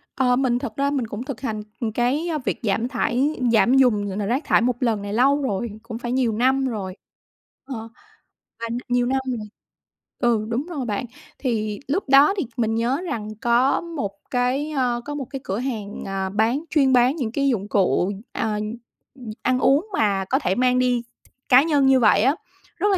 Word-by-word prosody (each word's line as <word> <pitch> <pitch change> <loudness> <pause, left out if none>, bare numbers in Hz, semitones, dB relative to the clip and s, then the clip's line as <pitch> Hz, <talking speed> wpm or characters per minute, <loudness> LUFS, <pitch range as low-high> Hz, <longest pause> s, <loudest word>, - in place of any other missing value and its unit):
Ờ, 250 -2 +3
mình 250 -2 +1
thật 220 - -6
ra 280 0 +1
mình 265 -5 -1
cũng 215 +2 -5
thực 265 -3 -7
hành 220 -5 -3 0.3
cái, 255 +8 0
ơ, 325 -2 -1
việc - - -1
giảm 220 +2 0
thải 260 +3 0 0.2
giảm 240 +3 +4
dùng, 215 -6 +3
ờ, 190 - -5
ờ, 205 - -1
rác 250 +8 0
thải - - +4
một 245 +1 +1
lần 225 -4 +1
này 200 0 -5
lâu 275 +5 +3
rồi, 235 -3 -2
cũng 235 -1 -6
phải 240 0 -4
nhiều 250 -3 +1
năm 260 +4 +2
rồi, 195 -6 -4 0.7
ờ, 230 -4 -6 0.7
và 230 - -3 0.2
nhiều 245 0 +2
năm 265 +2 +1 0.2
rồi 210 -1 -7 0.7
ừ, 230 -4 +2
đúng 240 +5 -1
rồi 290 -7 -4
bạn, 210 +1 -2 0.3
thì 215 -5 -2
lúc 295 0 -1
đó 280 +6 +7
thì 355 - 0
mình 225 -2 +1
nhớ 245 +7 0
rằng 225 -10 -4
có 240 +3 +3
một 325 -12 -4 0.2
cái, 255 +4 0
ơ, 250 -4 0
có 295 - -5
một 280 -2 -4
cái 270 - -6
cửa 195 +4 -3
hàng, 220 -6 -4
ờ, 195 -1 -2
bán 225 +8 +1
chuyên 275 -4 +3
bán 250 +3 +4
những 245 -9 -3
cái 275 +2 +1
dụng 205 -6 -1
cụ, 190 -2 +2 0.2
à, 215 -1 -1 0.6
ừm, 250 -5 -10
ăn 255 0 +1
uống 285 +11 +3
mà 200 - +1
có 265 +8 +1
thể 190 - 0
mang 250 +1 +2
đi 250 -1 +1 0.5
cá 255 +1 +7
nhân 295 -4 +2
như 265 -1 +5
vậy 210 -3 +5
á, 270 +6 +3 0.4
rất 415 - +1
là 385 - +3
245 Hz, 205 wpm, -23 LUFS, 220-270 Hz, 0.7 s, đó